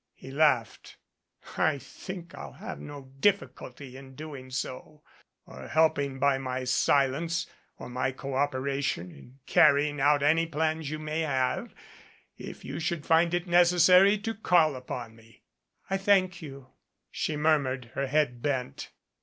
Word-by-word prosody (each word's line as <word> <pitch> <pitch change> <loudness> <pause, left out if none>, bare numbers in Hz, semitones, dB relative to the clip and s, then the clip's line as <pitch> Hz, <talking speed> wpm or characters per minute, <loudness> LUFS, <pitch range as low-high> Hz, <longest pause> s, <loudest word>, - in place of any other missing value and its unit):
He 135 - -11
laughed. 135 -6 +1 0.6
"I 155 -2 +2
think 175 +4 -9
I'll 140 - -9
have - - -8
no 140 -2 -10
difficulty 140 -9 -1
in 135 0 -12
doing 145 -4 -9
so 135 +3 -6 0.4
or - - -11
helping 145 -4 +1
by 135 0 +2
my 130 -1 -3
silence 140 +6 +1 0.3
or - - -9
my 125 +1 -2
cooperation 135 -7 -2
in 125 - -16
carrying 145 0 +4
out 145 0 +3
any 160 +3 +3
plans 160 -1 -1
you 155 - -4
may 155 +1 -4
have, 135 -5 -1 0.6
if - - -10
you - - -5
should 170 -2 -3
find 165 +1 +3
it 175 +1 -2
necessary 180 +3 +5
to 225 +2 -4
call 175 -8 +3
upon 125 -3 -7
me." 115 0 -21 0.4
"I 195 - 0
thank 190 -3 +2
you," 135 -4 -10 0.4
she 155 - -2
murmured, 135 -6 0
her 140 - -2
head 130 -4 0
bent. 130 -3 -3
145 Hz, 140 wpm, -28 LUFS, 130-160 Hz, 0.6 s, necessary